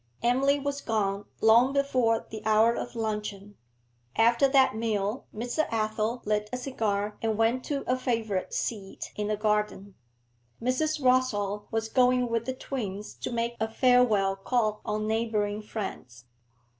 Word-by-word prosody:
Emily 270 Hz, +4 st, +3 dB
was 285 Hz, 0 st, -3 dB
gone 200 Hz, -2 st, -1 dB, 0.2 s
long 235 Hz, +4 st, +5 dB
before 255 Hz, -5 st, +1 dB
the 220 Hz, -1 st, -6 dB
hour 220 Hz, +1 st, +4 dB
of 240 Hz, -, -5 dB
luncheon. 210 Hz, -2 st, -4 dB, 0.6 s
After 235 Hz, +4 st, +4 dB
that 265 Hz, -5 st, +4 dB
meal, 215 Hz, 0 st, -2 dB
Mr. 245 Hz, +8 st, -2 dB
Athel 220 Hz, +1 st, -1 dB
lit 210 Hz, 0 st, 0 dB
a 250 Hz, -, -2 dB
cigar 210 Hz, -5 st, -2 dB
and 220 Hz, -2 st, 0 dB
went 230 Hz, +3 st, +2 dB
to 280 Hz, -2 st, -2 dB
a 255 Hz, -, +1 dB
favourite 225 Hz, -7 st, -2 dB
seat 200 Hz, -4 st, -4 dB
in 210 Hz, 0 st, -2 dB
the 215 Hz, 0 st, -1 dB
garden. 210 Hz, -2 st, -1 dB, 0.7 s
Mrs. 275 Hz, +6 st, 0 dB
Rossall 210 Hz, -6 st, +1 dB
was 225 Hz, -1 st, -1 dB
going 250 Hz, +1 st, +3 dB
with 230 Hz, 0 st, -1 dB
the 260 Hz, -, -3 dB
twins 210 Hz, -7 st, -5 dB
to -, -, -5 dB
make 235 Hz, 0 st, -1 dB
a 220 Hz, -, 0 dB
farewell 225 Hz, -5 st, +3 dB
call 215 Hz, +1 st, 0 dB
on 215 Hz, 0 st, -1 dB
neighbouring 215 Hz, -2 st, -1 dB
friends. 130 Hz, -, -7 dB
225 Hz, 145 wpm, -28 LUFS, 210-250 Hz, 0.7 s, long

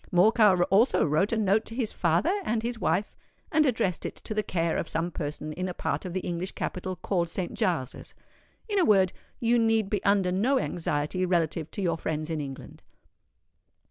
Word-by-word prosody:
Morcar 190 Hz, 0 st, +5 dB
also 220 Hz, +1 st, +4 dB
wrote 155 Hz, +7 st, +1 dB
a 230 Hz, -, +1 dB
note 210 Hz, +1 st, +2 dB
to 225 Hz, -, -3 dB
his 235 Hz, -4 st, -1 dB
father 175 Hz, -, +2 dB
and 225 Hz, -6 st, -1 dB
his 235 Hz, -1 st, -2 dB
wife, 185 Hz, +4 st, 0 dB, 0.4 s
and 310 Hz, -3 st, +4 dB
addressed 220 Hz, -8 st, 0 dB
it -, -, -4 dB
to -, -, -6 dB
the 215 Hz, -, +1 dB
care 170 Hz, -5 st, -1 dB
of -, -, -3 dB
some 165 Hz, +2 st, -2 dB
person 150 Hz, -1 st, -5 dB
in 185 Hz, +3 st, -3 dB
a 180 Hz, -, -6 dB
part -, -, -2 dB
of 180 Hz, -, -5 dB
the 185 Hz, -, -1 dB
English 175 Hz, +2 st, -3 dB
capital 185 Hz, 0 st, -4 dB
called 175 Hz, -2 st, -1 dB
Saint 180 Hz, +1 st, -4 dB
Giles's. 165 Hz, -8 st, -2 dB, 0.5 s
In 410 Hz, -2 st, +1 dB
a -, -, +4 dB
word, 195 Hz, -, +4 dB, 0.3 s
you 235 Hz, 0 st, +3 dB
need 225 Hz, -3 st, +2 dB
be 205 Hz, -, -1 dB
under 195 Hz, -2 st, +3 dB
no 230 Hz, +9 st, +2 dB
anxiety 175 Hz, -, -1 dB
relative 165 Hz, -3 st, 0 dB
to 200 Hz, -, -5 dB
your 170 Hz, -2 st, +1 dB
friends 155 Hz, 0 st, -3 dB
in 155 Hz, -2 st, -2 dB
England." 135 Hz, -2 st, -8 dB
185 Hz, 195 wpm, -27 LUFS, 170-220 Hz, 0.5 s, Morcar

